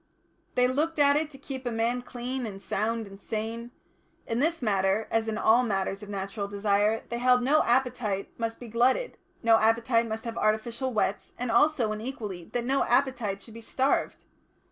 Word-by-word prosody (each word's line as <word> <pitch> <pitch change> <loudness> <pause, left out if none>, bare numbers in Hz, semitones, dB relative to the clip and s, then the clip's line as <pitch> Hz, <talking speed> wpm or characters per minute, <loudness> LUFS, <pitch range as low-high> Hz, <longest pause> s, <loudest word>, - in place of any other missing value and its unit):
They 250 0 +4
looked 305 +6 0
to 285 -1 +5
it 305 0 0
to 275 - -13
keep 265 -1 -7
a 245 - -2
man 230 +2 0
clean 250 0 -4
and 195 -2 -7
sound 220 +3 -2
and 195 0 -13
sane. 225 +2 -4 0.6
In 230 +1 -2
this 330 +4 +1
matter, 200 -2 +1
as 225 0 +1
in 220 -1 -2
all 225 +3 +5
matters 195 -3 -1
of 210 - -9
natural 200 +1 -4
desire, 205 +2 +1
they 235 - -3
held 250 0 +4
no 295 +5 +4
appetite 240 -5 0
must 230 -1 -3
be 245 - -9
glutted, 245 - +1 0.2
no 225 -1 +6
appetite 230 +1 +2
must 220 +1 -5
have 230 0 -4
artificial 230 +4 0
whets, 210 -3 -1
and 245 -1 -2
also 290 -7 +3
and 215 0 -4
equally 210 -8 -6
that 240 +5 -3
no 270 +2 +2
appetite 240 -6 +1
should 225 - -12
be 230 - -9
starved. 265 +4 0
230 Hz, 190 wpm, -28 LUFS, 215-250 Hz, 0.6 s, no